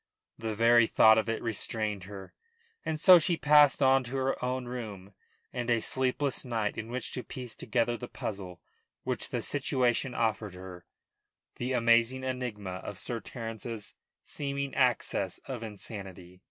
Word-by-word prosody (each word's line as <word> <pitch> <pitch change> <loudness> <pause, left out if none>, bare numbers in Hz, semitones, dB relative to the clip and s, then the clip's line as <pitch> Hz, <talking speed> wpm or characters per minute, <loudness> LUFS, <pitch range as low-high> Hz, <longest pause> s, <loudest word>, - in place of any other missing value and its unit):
The 110 -1 -3
very 115 +1 +5
thought 110 0 +6
of 110 - -2
it 115 - -2
restrained 110 -3 -1
her, 95 -1 -10 0.5
and 155 -1 -2
so 180 +1 +9
she 170 +1 +1
passed 150 -2 +5
on 135 0 +5
to 125 +3 -6
her 135 -1 -1
own 125 0 -1
room 105 -6 -7 0.4
and 120 -1 -3
a 115 -1 +3
sleepless 130 +3 0
night 115 -4 -2
in 110 0 -5
which 125 0 -4
to 125 - -3
piece 125 -4 -7
together 120 -1 0
the 125 - -7
puzzle 95 -7 -6 0.4
which - - -2
the - - -3
situation 130 -2 0
offered 105 -4 -1
her, 90 -1 -10 0.7
the 125 +2 -2
amazing 120 +2 +3
enigma 110 -8 -4
of 100 - -7
Sir 120 +4 -2
Terence's 115 0 -7 0.3
seeming 140 -1 -4
access 120 -7 +1
of 130 -4 -5
insanity. 95 -4 -8
115 Hz, 155 wpm, -30 LUFS, 105-130 Hz, 0.7 s, so